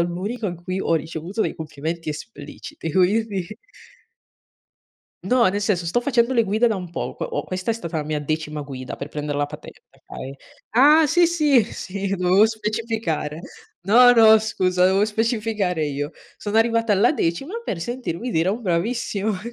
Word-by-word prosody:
l'unico 190 +7 -2
in 175 - -3
cui 185 +1 -3
ho 165 - +1
ricevuto 160 +6 -4
dei - - -3
complimenti 160 +1 -5
espliciti, 155 -1 -7
quindi 195 0 +1 1.7
No, 250 -3 +3
nel 205 +2 -1
senso 190 -4 0
sto 175 +9 0
facendo 245 -1 +1
le 230 -3 +3
guide 215 +4 +2
da 220 -3 +1
un 180 -2 -7
poco, - - -4
o - - -3
questa 185 +4 -3
è - - +1
stata 170 -7 -4
la 150 - -3
mia 150 0 -2
decima 150 0 -3
guida 130 -3 -7
per 140 - -6
prender 150 -1 -4
la 145 - +1
patente. 145 - -11
Okay. 135 +1 -10 0.4
Ah, 295 +6 +6
sì, 345 +4 +4
sì, 300 -8 +3
sì. 195 0 -5
Dovevo 180 +4 +4
specificare. 215 -8 -3 0.4
No, 245 +6 +7
no, 220 -2 +7
scusa, 185 -4 +1
dovevo 190 +2 +4
specificare 215 -6 -1
io. 145 +1 -3 0.3
Sono 210 +1 -3
arrivata 230 -1 +3
alla 215 +9 +4
decima 270 - -2
per 185 - -4
sentirmi 240 -1 -4
dire 165 -2 +1
un 225 +5 -2
"bravissima". 205 +2 -1
195 Hz, 165 wpm, -22 LUFS, 165-230 Hz, 1.7 s, No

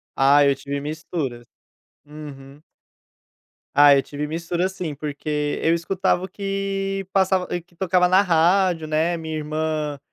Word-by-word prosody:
Ah 140 +1 +5
eu 140 -1 +3
tive 140 +1 -5
mistura. 150 -5 -5 0.6
Uhum. 145 -1 -11 1.1
Ah, 145 0 +7
eu 135 - +3
tive 145 +1 -5
mistura 170 +3 -2
sim, 170 -6 -5
porque 150 0 -3
eu 165 - +3
escutava 180 +1 0
o - - -4
que 195 -1 -3
passava 190 -1 +2
que 175 0 -29
tocava 180 0 +2
na 185 +2 +5
rádio, 175 -1 +2
né, 160 +3 0
minha 160 -1 -5
irmã, 155 -1 -3
160 Hz, 135 wpm, -22 LUFS, 145-180 Hz, 1.1 s, Ah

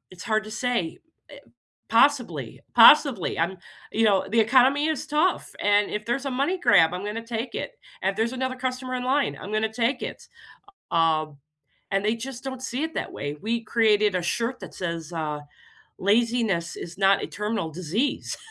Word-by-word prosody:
it's 185 -1 -11
hard 215 -2 0
to 215 - -9
say, 235 -6 -2 0.3
eh, - - -11 0.5
possibly, 225 - +2
possibly, 240 - +6
um, 175 +3 -1 0.3
you 225 - +2
know, 200 -3 +3
the 230 - 0
economy 260 +6 +4
is 310 -1 -2
tough 305 +5 0
and 205 0 +3
if 210 0 -4
there's 245 +4 -1
a - - -1
money 280 +9 0
grab, 180 - +4
I'm 180 +2 -5
gonna 225 +2 -5
take 230 +1 -4
it, - - -4 0.3
and, 195 +1 0
there's 225 +2 0
another 260 0 -2
customer 255 0 -3
in 250 - -2
line, 270 +2 +1
I'm 205 - -7
gonna 215 0 0
take 245 +3 0
it." - - -7 0.6
U - - +1
um, 155 -2 +1 0.5
and 195 0 0
they 215 +2 +2
just 250 +2 -8
don't 260 -1 -6
see 260 +2 -3
it 320 - -5
that - - -4
way. 145 +1 -4
We 230 +2 -2
created 215 -3 +3
a 180 - 0
shirt 235 +8 -2
that - - -10
says, 170 -2 -5
uh, 155 -3 -3 0.6
"Laziness 215 -4 +1
is 175 +2 -8
not 195 0 +4
a - - -2
terminal 210 -6 -3
disease," 185 - -2
220 Hz, 185 wpm, -25 LUFS, 185-255 Hz, 0.6 s, possibly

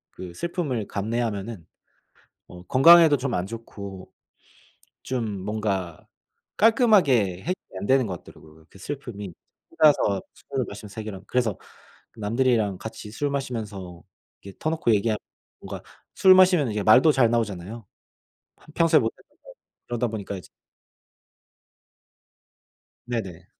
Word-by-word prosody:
그 90 -1 -8
슬픔을 145 - -3
감내하면은 110 -3 -3 0.8
어 90 0 -12
건강에도 155 - +7
좀 130 -2 -3
안 90 - -1
좋고 100 -4 -9 0.9
좀 115 -6 -3
뭔가 100 -5 -3 0.5
깔끔하게 185 - +4
해결이 180 - -1 0.3
안 100 - -4
되는 130 0 +3
것 90 -3 -6
같더라고요, 80 0 -17
그 - - -16
슬픔이. 105 -6 -6 0.4
혼자서 140 -10 +3
술을 - - -4
마시면 105 - -9
해결하면. 105 -3 -7
그래서 120 -5 0 0.6
남들이랑 110 -2 +1
같이 110 +1 -8
술 145 +5 -2
마시면서 105 -10 -5 0.4
이렇게 100 -1 -11
터놓고 155 -6 +1
얘기하면 110 +1 0 0.4
뭔가 - - -8 0.3
술 190 -1 +7
마시면 180 -8 +5
이제 105 0 -2
말도 130 +9 +6
잘 130 -5 +3
나오잖아요. 110 -1 -3 0.7
하 - - -24
평소에 165 -2 +5
못 - - -1
했던 - - -26
말. - - -14 0.3
그러다 120 0 -1
보니까 105 -3 -5
이제 90 - -13 2.6
네네. 95 -8 -5
110 Hz, 280 characters per minute, -25 LUFS, 100-135 Hz, 2.6 s, 건강에도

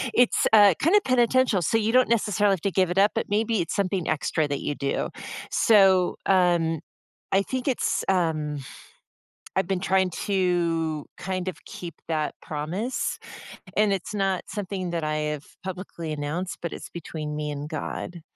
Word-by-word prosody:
it's, 245 -1 +4
uh, 205 -3 +8
kinda 370 +8 +5
penitential, 255 -4 +3
so 200 +7 +2
you 220 0 +1
don't 255 +1 +4
necessarily 210 -3 +2
have 185 - -3
to 200 - 0
give 185 -1 +2
it 180 - -3
up, 200 +2 +5
but - - -2
maybe 215 0 +1
it's 165 - -3
something 190 -3 0
extra 155 0 0
that 140 -1 -3
you - - -2
do. 140 -1 -2 0.4
So, 190 -4 +5
um, 175 -4 +3 0.5
I 195 - +5
think 255 +4 -4
it's, 260 - 0
um 155 -5 0 1.0
I've 190 - +1
been 190 -2 0
trying 190 0 +2 0.2
to 170 -5 0
kind 185 0 -3
of 185 - -5
keep 170 -3 -8
that 155 -2 -1
promise, 170 - -3 0.6
and 210 -1 +4
it's 195 +2 -3
not 195 -2 0
something 190 -3 -4
that 170 -2 -2
I 155 0 -1 0.2
have 145 - -14 0.2
publicly 180 -3 -6
announced, 155 +5 -3
but 170 - -3
it's - - -7
between 155 -3 -5
me 150 0 -3
and 145 0 -5
God. 170 +2 -5
185 Hz, 165 wpm, -25 LUFS, 160-205 Hz, 1.0 s, uh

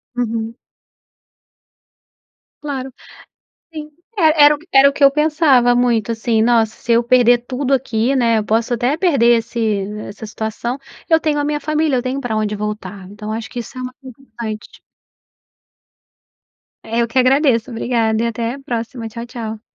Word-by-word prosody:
Uhum. 230 -1 -3 2.1
Claro. 270 -3 -5 0.8
Sim. 305 -1 -8 0.3
E - - 0 0.2
era 295 0 +7
era 270 +1 +6
o 280 - -6
que 285 - -1
eu 275 - +7
pensava 295 -5 +3
muito 235 -3 +1
assim, 225 0 0
nossa 225 -1 +2
se 235 - -4
eu 235 - +3
perder 245 0 +4
tudo 255 +3 -2
aqui, 250 0 0
né, 230 -4 +2
posso 225 +3 0
até 250 +5 0
perder 255 -10 +3
esse 220 -4 -2 0.2
essa 220 +2 -9
situação, 220 +3 -4 0.3
eu 320 0 +5
tenho 305 -2 0
a 290 - 0
minha 295 0 -1
família, 305 -1 0
eu - - 0
tenho 260 +2 -3
pra 220 -3 -2
onde 210 -1 -1
voltar. 205 -2 -6
Então 210 +1 -9
eu - - -2
acho 230 - -7
que 245 - -6
isso 240 +3 -9
é 255 - -5
o - - -5
mais 255 - -9
importante. 235 -4 -9 2.0
Eh, 230 +1 -2
eu 235 - 0
que 260 +3 0
agradeço, 260 -2 +3
obrigada, 230 -1 0
até 230 0 -3
a - - -11
próxima, 235 -2 -5
tchau, 235 +1 -7
tchau. 225 -3 -7
240 Hz, 165 wpm, -18 LUFS, 225-270 Hz, 2.1 s, era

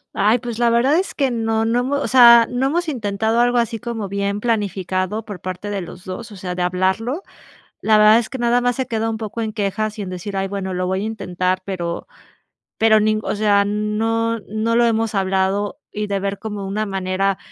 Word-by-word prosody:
Ay, 215 +4 +3
pues, 235 -1 -6
la 240 -1 +4
verdad 245 +6 +3
es 385 - -4
que 270 -3 +1
no 225 -1 0
no 230 +2 +1
hemo 265 +3 -1
o 280 - -1
sea, 235 -2 +8
no 250 +2 0
hemos 340 +3 -1
intentado 220 -3 -1
algo 245 0 +3
así 230 -1 0
como 235 -4 -4
bien 200 +1 -2
planificado 200 -2 -1
por 205 -4 -7
parte 185 +3 -5
de 200 -2 -2
los 175 +1 -10
2, 215 +5 -7
o - - -10
sea, 185 -1 -5
de 180 - -4
hablarlo. 190 - 0 0.6
La 215 -1 +4
verdad 215 +1 +7
es 235 - -1
que 265 - -5
nada 240 0 +2
más 245 0 0
se 260 - -1
queda 225 -1 -1
un 225 - -3
poco 220 +1 -5
en 220 -1 -2
quejas, 215 0 -2
y - - -2
en 190 - -6
decir: 185 +2 -5
"Ay, 195 - -1
bueno, 190 -1 -4
lo 180 0 -1
voy 190 +1 -1
a - - -3
intentar", 185 -4 -2
pero 175 -3 -4 0.7
pero 220 -1 +5
nin 215 0 +2
o - - -2
sea, 205 -1 +3
no 225 +2 -1
no 220 +2 0
lo 240 - +4
hemos 225 -1 0
hablado. 195 +1 0
Y 210 0 -3
de 200 -1 -1
ver 200 0 -3
como 210 -3 -5
una 210 +3 -2
manera 195 0 -1
215 Hz, 225 wpm, -20 LUFS, 195-230 Hz, 0.7 s, sea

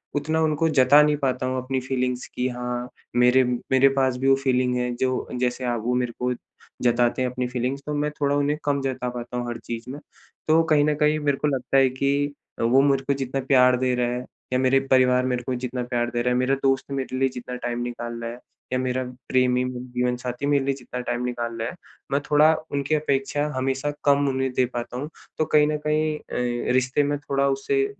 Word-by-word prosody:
उतना 155 +2 0
उनको 155 +1 +1
जता 140 0 +6
नहीं 150 0 +3
पाता 130 -3 -1
हूँ 130 0 -1
अपनी 130 0 -1
फ़ीलिंग्स 125 -1 -2
की 125 - 0
हाँ, 125 0 -4 0.3
मेरे 125 +2 +5 0.3
मेरे 130 +1 +6
पास 130 -2 +2
भी 135 +2 -1
वो 135 - +6
फ़ीलिंग 125 -1 +2
है 125 0 -1
जो 130 +1 -1
जैसे 125 +1 -1
आप 120 -2 -1
वो 125 - +1
मेरे 125 -1 0
को 125 0 0 0.5
जताते 120 0 +2
हैं 130 - +1
अपनी 125 0 -3
फ़ीलिंग्स 125 +2 -2
तो 150 - -3
मैं 150 +1 0
थोड़ा 140 0 +2
उन्हें 145 +1 +1
कम 140 -1 +1
जता 130 -2 -2
पाता 120 0 -6
हूँ 120 0 -3
हर 120 - -4
चीज़ 115 +1 -6
में। 140 +3 -6 0.5
तो 160 +1 +5
कहीं 155 -2 +3
न 150 0 +1
कहीं 150 +1 +2
मेरे 145 -2 0
को 150 - 0
लगता 135 -1 0
है 135 -1 +5
कि 140 +2 0 0.3
अ, - - 0
वो 125 +4 +5
मुझ 140 -1 +3
को 140 +1 0
जितना 135 0 -3
प्यार 125 -2 +5
दे 130 0 +1
रहा 125 0 +1
है, 125 +1 -5 0.3
या 125 - +2
मेरे 130 +1 +4
परिवार 130 -1 +4
मेरे 125 -1 -1
को 130 +1 -2
जितना 125 0 -3
प्यार 120 -1 -1
दे 120 - -1
रहा 125 +1 +1
है, - - +1
मेरा 130 +2 +2
दोस्त 135 0 +1
मेरे 130 -1 -3
लिए 135 0 +2
जितना 125 0 -7
टाइम 120 -1 -3
निकाल 120 -1 -5
रहा 115 0 -4
है, 120 - -10 0.3
या 130 - +1
मेरा 130 0 -1 0.3
प्रेमी 125 -1 +3
मेरा 125 0 -5
जीवन-साथी 125 +1 -2
मेरे 140 -1 +2
लिए 140 - +1
जितना 125 -1 -7
टाइम 120 0 -2
निकाल 120 -1 -3
ला 115 - -2
है। 125 - -5 0.4
मैं 140 +1 +1
थोड़ा, 150 +2 +6 0.2
उनकी 140 +2 0
अपेक्षा 145 -1 0
हमेशा 135 +2 -1
कम 140 0 +4
उन्हें 130 0 -1
दे 125 - +2
पाता 120 0 -4
हूँ, 145 +4 -4 0.3
तो 155 - +1
कहीं 150 -1 +4
न 150 0 0
कहीं 155 0 +1
अ, 120 -1 -2
रिश्ते 130 +3 +2
में 145 +1 0
थोड़ा 140 -1 0
उससे 405 - +1
130 Hz, 225 wpm, -24 LUFS, 125-140 Hz, 0.5 s, जता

